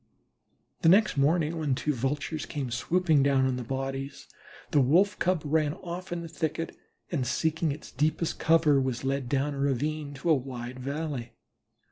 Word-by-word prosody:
The 165 - +5
next 205 +1 +5
morning 155 +3 +2
when 145 -4 +1
two 150 +3 -1
Vultures 145 +4 -2
came 135 -4 -4
swooping 160 +4 +2
down 135 -1 +3
on 130 -1 +1
the 125 - -4
bodies, 135 +2 -4 0.4
the 145 - +4
Wolf 180 +10 +3
cub 180 -3 +1
ran 150 0 +1
off 180 0 -7
in 170 -1 -3
the - - -6
thicket, 160 +1 -3 0.4
and 135 -7 -1
seeking 160 +4 0
its 150 +2 -8
deepest 155 +4 0
cover, 160 -4 +4
was 130 -2 -2
led 135 -2 -1
down 140 +2 0
a 140 - -6
ravine 145 +2 -1
to 160 +5 0
a - - +8
wide 125 -2 -4
valley. 140 -3 -4
145 Hz, 170 wpm, -28 LUFS, 135-160 Hz, 0.4 s, a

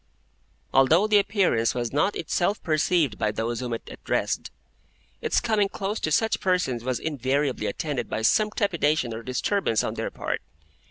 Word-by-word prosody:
Although 155 +9 +5
the 215 -1 +5
Appearance 190 - +1
was 120 -1 -2
not 190 +8 +2
itself 200 +4 0
perceived 155 - +1
by 110 - +1
those 115 +2 -2
whom 125 -1 -4
it 115 - -3
addressed, - - -2 0.7
its - - +2
coming 215 -4 +1
close 200 +3 -3
to 155 - -2
such 225 +8 +2
persons 180 -11 0
was 130 -1 -1
invariably 140 -2 -1
attended 145 -4 -3
by 110 - -2
some 215 - +3
trepidation 155 - 0
or 110 - -5
disturbance 130 - 0
on - - -2
their - - -3
part. - - -3
150 Hz, 160 wpm, -25 LUFS, 120-195 Hz, 0.7 s, Although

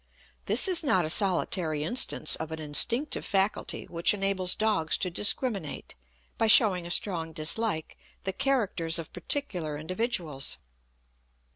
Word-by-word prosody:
This - - +6
is 360 -3 +4
not 185 - +2
a 155 - -1
solitary 175 -5 0
instance 240 +11 0
of 160 0 -6
an 160 - -5
instinctive 195 - 0
faculty 195 +1 -1
which 170 +4 0
enables 195 -2 +1
dogs 210 -8 0
to 180 - -3
discriminate, 205 - 0 0.5
by 225 - +2
showing 195 -6 +4
a - - -8
strong 170 -3 -1
dislike, 160 +2 +1 0.2
the 190 - -3
characters 215 -12 -1
of 165 -2 -7
particular 175 - -3
individuals. 170 - -1
185 Hz, 130 wpm, -27 LUFS, 160-220 Hz, 0.5 s, This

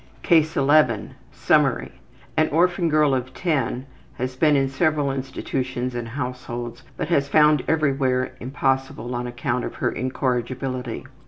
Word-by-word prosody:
CASE 160 -3 +3
11 140 -6 +3 0.2
Summary: - - +2 0.4
An 155 0 +3
orphan 175 +2 +2
girl 150 -2 +3
of 130 0 -2
10 135 -7 -1 0.3
had 130 +1 -4
been 150 -2 +5
in 135 -1 +2
several 145 0 +1
institutions 130 -1 -3
and 120 -1 -4
households, 120 -2 -5 0.2
but 170 - -3
was 140 -4 +3
found 150 -2 +5
everywhere 135 -4 +1
impossible 130 -1 -1
on 120 0 -3
account 120 0 -2
of - - -5
her - - 0
incorrigibility. 130 -1 -2
135 Hz, 135 wpm, -23 LUFS, 125-150 Hz, 0.4 s, been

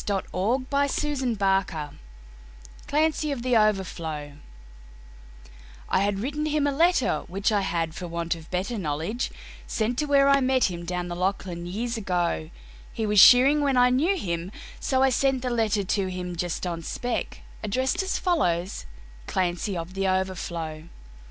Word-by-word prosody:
Andrew 200 +6 -1
Barton 280 -3 0
Paterson 185 -7 0 0.9
Clancy 305 0 +1
Of 255 -4 -4
The 250 -1 +2
Overflow 170 -8 0 1.6
I - - +3
HAD 200 0 +1
written 290 +8 -2
him 300 -1 +1
a 285 - +2
letter 285 - +2
which 195 +4 0
I 205 -1 +2
had, 165 -4 -1
for 175 +1 -6
want 170 0 -2
of 165 -2 -11
better 195 +5 -2
Knowledge, 165 - -2 0.4
sent 235 +2 -1
to 300 - +1
where 280 -1 +4
I 275 0 +5
met 260 -5 +2
him 170 -1 -6
down 180 0 -3
the 175 - -4
Lachlan 180 -1 -2
years 230 +6 -3
ago; 175 - -1 0.4
He 220 - -3
was 210 -1 +3
shearing 265 +7 +8
when 275 -3 +2
I 250 0 +5
knew 325 +10 +2
him, 175 - -3 0.3
so 265 -1 +1
I 270 - +5
sent 265 0 +1
the 250 - -1
letter 220 -3 +1
to 195 +1 0
him, 180 -1 -5
Just 175 +1 -3
on 170 -2 -3
spec, 245 +8 -4 0.2
addressed 260 - 0
as 380 0 -1
follows, 185 - 0 0.4
"Clancy, 180 +2 -1
of 170 +2 -6
The 195 0 -1
Overflow." 170 -4 -2
200 Hz, 160 wpm, -26 LUFS, 175-260 Hz, 1.6 s, shearing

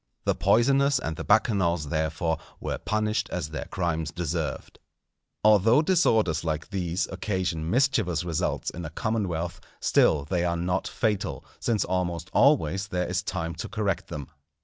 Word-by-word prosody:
The - - +3
poisoners 140 +4 +3
and 80 -8 -3
the - - -5
Bacchanals, 90 -8 +2
therefore, 80 +1 -1 0.2
were - - -3
punished 110 0 -1
as 85 -4 -3
their 75 -4 -5
crimes 80 -4 -2
deserved. 80 -4 -4 0.6
Although 110 - +5
disorders 110 - +2
like 80 +3 -3
these 90 -2 -1
occasion 90 -4 -2
mischievous 115 - +2
results 85 -3 -1
in 85 - -7
a 80 - -5
commonwealth, 90 -2 -2 0.2
still 70 -2 +3
they 85 +3 0
are 85 -1 0
not 90 +2 -1
fatal, 105 -4 -1
since 110 -5 0
almost 90 -2 -2
always 95 +6 +3
there 90 -2 -1
is 90 +1 -1
time 85 -4 -3
to - - -6
correct 105 -4 -1
them. 75 -5 -6
90 Hz, 150 wpm, -26 LUFS, 80-105 Hz, 0.6 s, Although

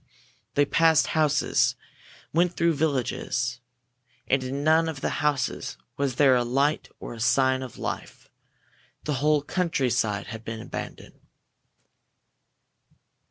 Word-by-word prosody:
They 145 - +4
passed 160 +1 +4
houses, 150 -2 +2 0.6
went 175 +2 +2
through 170 0 +3
villages. 125 -4 -1 0.7
And 135 0 +1
in 135 +2 -3
none 160 +1 +4
of 145 -4 -6
the - - -2
houses 145 -5 -1 0.2
was 140 -3 -1
there 135 -1 +5
a 120 - +2
light 140 +5 0
or - - -7
a 115 - -10
sign 130 +2 +3
of 130 -3 -8
life. - - -6 0.8
The 150 - -1
whole 150 -1 +3
countryside 125 - 0
had 110 0 -8
been 115 0 -5
abandoned. - - -8
140 Hz, 120 wpm, -26 LUFS, 125-155 Hz, 0.8 s, there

